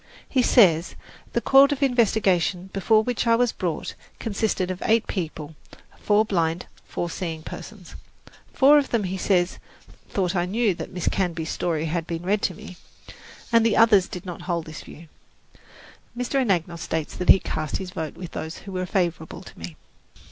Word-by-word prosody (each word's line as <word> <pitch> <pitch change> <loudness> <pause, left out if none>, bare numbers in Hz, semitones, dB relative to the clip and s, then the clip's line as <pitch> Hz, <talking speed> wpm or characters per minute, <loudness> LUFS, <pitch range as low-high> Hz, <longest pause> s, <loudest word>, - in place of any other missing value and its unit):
He 260 - +2
says, 180 -10 +4 0.4
the - - +1
court 275 +1 +6
of 285 -1 -1
investigation 195 -7 +1
before 215 +3 +3
which 245 0 -2
I 230 - +5
was 245 0 +2
brought 170 -4 -3 0.2
consisted 200 -4 -1
of 185 - -6
eight 225 0 +3
people: 160 -4 -5 0.5
four 210 +1 +3
blind, 170 -4 -1 0.2
four 175 - -3
seeing 165 -2 -5
persons. 190 -1 -10 0.6
Four 290 +2 +6
of 280 - -3
them, 230 -3 0
he 185 0 -3
says, 180 -1 +1 0.5
thought 190 -1 -1
I 175 0 0
knew 215 +1 +1
that 170 - -7
Miss 180 -2 -4
Canby's 170 -4 -1
story 160 -2 -1
had 165 +1 -2
been 165 0 -4
read 200 +3 +1
to 180 - -1
me, 180 - -11 0.7
and 230 -1 +5
the 225 -2 +2
others 215 -5 +5
did 180 -4 -8
not 175 -1 -7
hold 170 -2 -1
this 155 -1 -8
view. 165 +2 -13 1.1
Mr. 250 +2 0
Anagnos 175 -7 -1
states 160 -2 -3
that 180 - -4
he - - +10
cast 155 -4 -3
his 185 -2 -7
vote 160 -4 -5
with 175 -1 -8
those 160 +2 -6
who 195 - -7
were 185 -1 -3
favourable 175 -2 -2
to - - -14
me. 85 -1 -8
185 Hz, 175 wpm, -24 LUFS, 170-220 Hz, 1.1 s, he